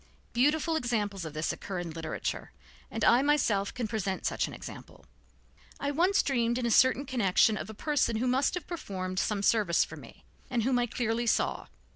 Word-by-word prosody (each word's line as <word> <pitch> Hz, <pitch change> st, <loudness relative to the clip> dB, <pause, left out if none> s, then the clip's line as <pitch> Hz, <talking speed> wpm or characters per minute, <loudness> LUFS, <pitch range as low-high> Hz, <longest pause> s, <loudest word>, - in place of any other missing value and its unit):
Beautiful 300 Hz, +6 st, +2 dB
examples 210 Hz, -, -1 dB
of 155 Hz, -, -7 dB
this 155 Hz, +1 st, -1 dB
occur 195 Hz, -, -6 dB
in 175 Hz, -2 st, -4 dB
literature, 160 Hz, 0 st, -4 dB, 0.4 s
and -, -, -4 dB
I 240 Hz, -, +6 dB
myself 255 Hz, -9 st, +2 dB
can 240 Hz, -3 st, -3 dB
present 200 Hz, -3 st, -3 dB
such -, -, 0 dB
an -, -, -9 dB
example. -, -, -11 dB, 0.7 s
I 285 Hz, -, -1 dB
once 355 Hz, +7 st, +3 dB
dreamed 240 Hz, -3 st, +1 dB
in 250 Hz, -, -1 dB
a 235 Hz, -, +1 dB
certain 260 Hz, +4 st, +4 dB
connection 220 Hz, -4 st, +3 dB
of -, -, -5 dB
a 220 Hz, -, -8 dB
person 290 Hz, -3 st, 0 dB
who 230 Hz, +3 st, 0 dB
must 260 Hz, +6 st, +2 dB
have 355 Hz, -4 st, -5 dB
performed 185 Hz, -, -4 dB
some 205 Hz, -1 st, -1 dB
service 205 Hz, -6 st, +3 dB
for -, -, -10 dB
me, -, -, -14 dB, 0.3 s
and 240 Hz, -3 st, 0 dB
whom 250 Hz, +1 st, +2 dB
I 240 Hz, -, +1 dB
clearly 235 Hz, 0 st, -1 dB
saw. -, -, 0 dB
235 Hz, 190 wpm, -29 LUFS, 200-265 Hz, 0.7 s, I